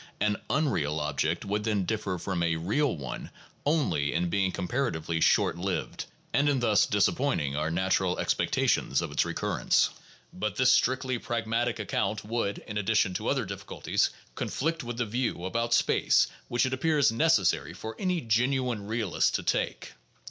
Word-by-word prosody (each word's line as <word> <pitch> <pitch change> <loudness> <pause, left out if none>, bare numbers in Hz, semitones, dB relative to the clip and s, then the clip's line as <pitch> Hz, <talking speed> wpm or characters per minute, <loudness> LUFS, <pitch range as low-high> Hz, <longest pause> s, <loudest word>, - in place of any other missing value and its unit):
An 105 0 +1
"unreal" 85 - 0
object 75 +4 -1
would 105 +1 -1
then 105 -4 0
differ 105 -4 -2
from 90 0 -3
a 85 -1 +1
"real" 105 - 0
one 65 -3 -6 0.4
only 140 - +1
in 85 0 0
being 95 -2 +1
comparatively 90 - -2
short 85 - +3
lived, 95 0 -3 0.3
and 145 +1 +3
in 140 -2 +2
thus 110 -4 +3
disappointing 100 - +1
our 75 +2 0
natural 95 +1 +1
expectations - - +1
of - - -5
its - - +1
recurrence. - - +1 0.4
But - - -3
this - - +4
strictly 130 -1 +1
pragmatic 115 +1 -1
account 105 0 -2
would 110 -2 -1
(in 105 -1 -3
addition 105 -2 +2
to - - -3
other - - +1
difficulties) - - -1 0.2
conflict 165 +2 -2
with 120 -1 -5
the 120 - 0
view 115 -5 -2
about 115 +5 -1
space - - +4 0.2
which 120 +2 +1
it 130 - -1
appears 145 -1 +3
necessary 115 - +2
for 110 +4 -7
any 180 -3 0
genuine 120 -1 0
realist 110 -4 0
to - - -1
take. - - -1
110 Hz, 155 wpm, -28 LUFS, 90-125 Hz, 0.4 s, this